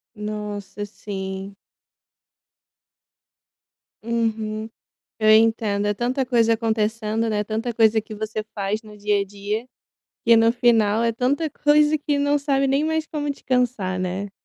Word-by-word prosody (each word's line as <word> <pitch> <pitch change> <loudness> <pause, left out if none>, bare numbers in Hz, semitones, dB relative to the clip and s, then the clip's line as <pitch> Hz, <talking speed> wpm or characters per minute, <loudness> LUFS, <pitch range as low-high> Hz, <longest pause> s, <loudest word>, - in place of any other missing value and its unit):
Nossa, 210 -1 -5
sim. 195 -1 -6 2.5
Uhum. 220 -1 -2 0.5
Eu 215 0 +3
entendo. 215 -2 +3
É 205 - +1
tanta 250 +5 -1
coisa 230 -2 +3
acontecendo, 220 0 -1
né? 210 -1 0
Tanta 225 +3 -3
coisa 220 -1 +4
que 215 - -10
você 215 0 -4
faz 205 +1 -2
no 210 -1 -13
dia 205 0 +1
a - - -3
dia. 205 +3 -4 0.6
E 230 0 +7
no 225 0 +5
final, 230 -3 +3
é 230 0 +2
tanta 270 +7 0
coisa, 295 +1 +3
que 290 -1 -1
não 285 +1 +2
sabe 275 -1 +1
nem 275 +2 +2
mais 320 0 -1
como 295 -1 -3
descansar, 250 -9 -1
né? 185 +2 -3
220 Hz, 135 wpm, -23 LUFS, 210-250 Hz, 2.5 s, E